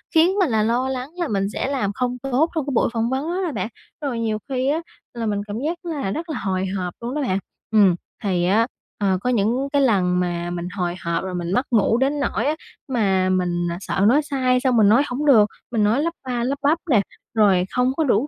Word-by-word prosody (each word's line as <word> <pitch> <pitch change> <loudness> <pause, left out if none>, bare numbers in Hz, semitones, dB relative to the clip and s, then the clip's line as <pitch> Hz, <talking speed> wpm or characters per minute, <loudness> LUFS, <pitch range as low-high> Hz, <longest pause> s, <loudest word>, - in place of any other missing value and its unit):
khiến 330 +4 +5
mình 355 -8 +3
là 220 -2 +2
lo 245 +4 +1
lắng 260 +1 -4
là 345 -3 -1
mình 195 -1 0
sẽ - - -2
làm 250 -8 -1
không 250 +2 -2
tốt 270 +5 +2
trong 310 - 0
cái 280 - -3
buổi 230 - +2
phỏng 230 0 0
vấn 270 +4 -1
đó 365 +2 -1
đó 330 - -2
bạn. 210 -5 -2 0.3
Rồi 270 -5 -2
nhiều 220 -2 0
khi 260 0 0
á 305 +3 +1 0.3
là 235 -1 -3
mình 205 -2 -1
cảm 205 - -5
giác 345 +2 -3
là 290 - -2
rất 330 - -4
là 310 - -3
hồi 190 -1 -1
hộp 180 -1 -3
luôn 240 +3 -4
đó 300 - -1
bạn. 195 -7 0 0.3
Ừm, 200 -5 +5 0.3
thì 180 -3 +1
á, 220 +5 +3 0.3
ờ, 190 -2 +2
có 250 - -1
những 240 +4 +1
cái 285 - +4
lần 185 -8 +2
mà 175 -1 -2
mình 175 0 -4
hồi 175 -1 -1
hộp 170 +1 -1
rồi 185 -1 -4
mình 175 0 -3
mất 250 +3 +1
ngủ 225 0 +3
đến 275 +3 +1
nỗi 275 -3 -1
á 305 +2 +1 0.3
mà 195 -7 +1
mình 175 -2 0
sợ 190 - -3
nói 275 +7 +5
sai, 255 -3 +1
xong 250 -2 +2
mình 210 -2 +6
nói 235 +7 +5
hổng 270 +4 -3
được, 220 -8 +6 0.2
mình 225 -3 +1
nói 220 +7 +3
lắp 335 +1 -1
ba 245 -2 -1
lắp 270 +3 -1
bắp 305 +4 +4
nè, 215 - +5 0.3
rồi 200 -5 +4
không 250 +1 +1
có 320 - +2
đủ 260 0 +2
235 Hz, 245 wpm, -22 LUFS, 195-275 Hz, 0.3 s, mình